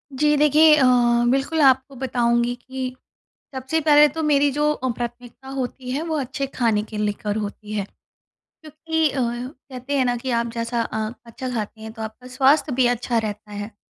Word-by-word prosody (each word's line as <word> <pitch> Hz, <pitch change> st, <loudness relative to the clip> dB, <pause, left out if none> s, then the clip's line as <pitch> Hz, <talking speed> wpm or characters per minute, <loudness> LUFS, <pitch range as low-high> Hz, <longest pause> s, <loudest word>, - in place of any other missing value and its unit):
जी 300 Hz, +2 st, +3 dB
देखिए 300 Hz, +1 st, +6 dB
अ, 295 Hz, -, +3 dB, 0.5 s
बिल्कुल 280 Hz, +4 st, 0 dB
आपको 265 Hz, 0 st, +3 dB
बताऊँगी 240 Hz, -1 st, +1 dB
कि 255 Hz, +1 st, -6 dB, 0.6 s
सबसे 260 Hz, +5 st, -1 dB
पहले 300 Hz, -1 st, +6 dB
तो 320 Hz, +3 st, -4 dB
मेरी 290 Hz, -1 st, +3 dB
जो 295 Hz, +1 st, +1 dB
अ, 260 Hz, -3 st, -3 dB
प्राथमिकता 240 Hz, +2 st, -7 dB
होती 260 Hz, -1 st, -5 dB
है 285 Hz, +5 st, -2 dB
वो 325 Hz, -1 st, -2 dB
अच्छे 275 Hz, +1 st, -3 dB
खाने 225 Hz, -4 st, +1 dB
के 215 Hz, 0 st, -8 dB
लेकर 210 Hz, 0 st, -2 dB
होती 210 Hz, 0 st, -5 dB
है। 205 Hz, -2 st, -1 dB, 0.6 s
क्योंकि 315 Hz, +1 st, -2 dB
अ, 270 Hz, -, -5 dB
कहते 255 Hz, +2 st, -4 dB
हैं 260 Hz, -, +3 dB
ना, 245 Hz, -1 st, +1 dB
कि 255 Hz, +2 st, -4 dB
आप 235 Hz, -1 st, 0 dB
जैसा 230 Hz, 0 st, -1 dB
अ, 220 Hz, -1 st, -3 dB, 0.2 s
अच्छा 245 Hz, +3 st, -6 dB
खाते 220 Hz, -1 st, -4 dB
हैं 220 Hz, 0 st, -8 dB
तो 225 Hz, -1 st, -8 dB
आपका 220 Hz, +3 st, -8 dB
स्वास्थ्य 275 Hz, +2 st, +3 dB
भी 255 Hz, -1 st, +3 dB
अच्छा 240 Hz, -1 st, 0 dB
रहता 210 Hz, -1 st, -5 dB
है। 205 Hz, +1 st, -6 dB
255 Hz, 180 wpm, -22 LUFS, 230-285 Hz, 0.6 s, देखिए